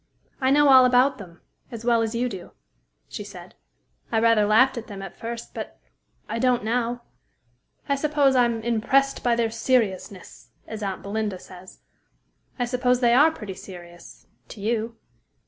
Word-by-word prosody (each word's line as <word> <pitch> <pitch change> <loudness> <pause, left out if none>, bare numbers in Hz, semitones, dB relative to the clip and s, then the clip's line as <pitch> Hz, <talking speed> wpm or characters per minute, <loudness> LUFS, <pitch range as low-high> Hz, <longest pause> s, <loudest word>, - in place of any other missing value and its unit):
"I 260 - +2
know 290 +1 +5
all 260 -1 +8
about 250 +2 +3
them, 175 -4 -12 0.3
as 230 -1 -8
well 235 -1 +3
as 225 +1 -2
you 245 +2 0
do," 190 -7 -8 0.5
she - - -7
said. - - -12 0.6
"I 225 - +2
rather 225 -2 +3
laughed 255 +6 +4
at 235 -2 -7
them 200 -3 -8
at 195 - -9
first, 230 0 -7
but - - -7 0.5
I 230 - -3
don't 250 -1 +2
now. 240 +1 -1 0.8
I 280 - +1
suppose 285 -1 +2
I'm 235 -3 +2
'impressed 250 +4 +1
by 240 -1 +2
their 230 -1 0
seriousness,' 220 -6 -2 0.2
as 220 -1 -7
aunt 195 -2 -4
Belinda 205 -1 -3
says. 185 0 -14 0.8
I 245 - 0
suppose 250 0 +1
they 240 -2 +3
are 295 +6 +6
pretty 215 -11 -7
serious 175 -2 -13 0.2
to 220 - -11
you." 225 +2 -2
230 Hz, 165 wpm, -24 LUFS, 210-250 Hz, 0.8 s, all